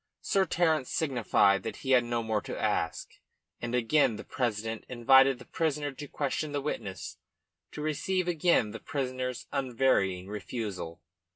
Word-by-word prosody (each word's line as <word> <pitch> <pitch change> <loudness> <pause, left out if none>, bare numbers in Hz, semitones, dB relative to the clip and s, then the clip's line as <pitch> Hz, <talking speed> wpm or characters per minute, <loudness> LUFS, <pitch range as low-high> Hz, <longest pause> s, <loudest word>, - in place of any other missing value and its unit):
Sir 195 -1 +2
Terence 160 -6 +1
signified 120 - +2
that 110 - -5
he 135 - -4
had 125 -2 +6
no 120 -1 -1
more 110 -2 0
to - - -6
ask, - - -1 0.5
and 120 +1 -2
again 125 0 +3
the - - -7
president 115 -2 -2
invited 135 +2 +5
the 125 - -13
prisoner 150 -3 -1
to 145 +2 -8
question 145 +2 -2
the 145 - 0
witness, 95 - -5 0.5
to 150 - -6
receive 180 +4 -1
again 165 -10 +2
the - - -7
prisoner's 130 -3 -3
unvarying 115 -8 +1
refusal. 100 -5 -5
125 Hz, 150 wpm, -29 LUFS, 110-145 Hz, 0.5 s, had